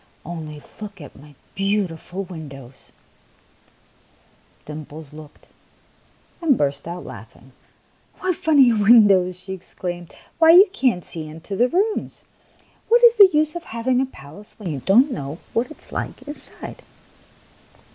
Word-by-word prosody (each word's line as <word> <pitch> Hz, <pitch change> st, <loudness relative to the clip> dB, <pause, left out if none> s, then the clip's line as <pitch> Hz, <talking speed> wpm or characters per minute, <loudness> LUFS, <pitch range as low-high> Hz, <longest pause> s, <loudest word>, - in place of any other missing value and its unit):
Only 155 Hz, -3 st, -7 dB, 0.2 s
look 205 Hz, -2 st, -8 dB
at 145 Hz, -4 st, -12 dB
my 145 Hz, 0 st, -16 dB, 0.2 s
beautiful 195 Hz, -2 st, -2 dB
windows! 140 Hz, -8 st, -11 dB, 0.8 s
" -, -, -35 dB
Dimples 150 Hz, 0 st, -9 dB
looked, 155 Hz, -1 st, -14 dB, 1.0 s
and 300 Hz, -7 st, +3 dB
burst 140 Hz, +1 st, -1 dB
out 175 Hz, +1 st, -6 dB
laughing. 115 Hz, +5 st, -12 dB, 0.3 s
" -, -, -38 dB
What 370 Hz, -2 st, -1 dB
funny 280 Hz, -8 st, +4 dB
windows! 200 Hz, -4 st, +5 dB
" -, -, -12 dB
she 190 Hz, -, -6 dB
exclaimed. 175 Hz, -1 st, -7 dB, 0.2 s
" -, -, -35 dB
Why, 325 Hz, 0 st, +7 dB
you 380 Hz, +4 st, +9 dB
can't 250 Hz, -, 0 dB
see 160 Hz, -2 st, -4 dB
into 160 Hz, +6 st, -8 dB
the 245 Hz, +5 st, +2 dB
rooms! 410 Hz, -, -1 dB, 0.7 s
What 475 Hz, +1 st, +4 dB
is 475 Hz, -1 st, +7 dB
the 400 Hz, -2 st, +9 dB
use 305 Hz, +1 st, +1 dB
of 345 Hz, -, -6 dB
having 245 Hz, +3 st, 0 dB
a 265 Hz, -, -1 dB
palace 195 Hz, -, -14 dB
when 195 Hz, -6 st, -5 dB
you 140 Hz, -, -4 dB
don't 240 Hz, -, +4 dB
know 145 Hz, -, -5 dB, 0.2 s
what 235 Hz, +5 st, 0 dB
it 310 Hz, -, -12 dB
is -, -, -20 dB
like -, -, -5 dB
inside 295 Hz, +1 st, -6 dB
195 Hz, 150 wpm, -22 LUFS, 155-260 Hz, 1.0 s, you